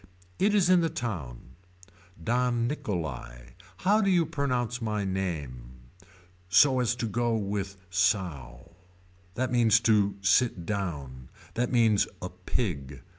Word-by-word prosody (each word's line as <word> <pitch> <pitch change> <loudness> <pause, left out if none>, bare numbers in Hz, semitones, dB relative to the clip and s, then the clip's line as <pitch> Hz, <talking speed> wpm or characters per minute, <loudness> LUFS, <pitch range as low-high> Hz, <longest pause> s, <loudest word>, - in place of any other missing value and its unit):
It 205 +2 +3
is 195 -4 +4
in 180 -1 +5
the 165 - +1
town. 85 - -6 0.7
Don 120 +2 +1
Nicholai. 70 - -5 0.4
How 210 +3 +4
do 195 - +2
you 175 -3 +3
pronounce 125 -6 -2
my 105 -2 -2
name. 75 -11 -4 0.8
So 130 +8 +5
as 125 -1 +1
to 120 - -3
go 120 +1 0
with 100 -2 -3
sow. 85 - -1 0.6
That 130 +1 -1
means 115 -3 +4
to 105 -3 +3
sit 95 -1 +2
down. 70 -11 -4 0.2
That 120 +1 -1
means 115 -4 +3
a 90 - -5
pig. 80 - -4
105 Hz, 125 wpm, -28 LUFS, 85-125 Hz, 0.8 s, in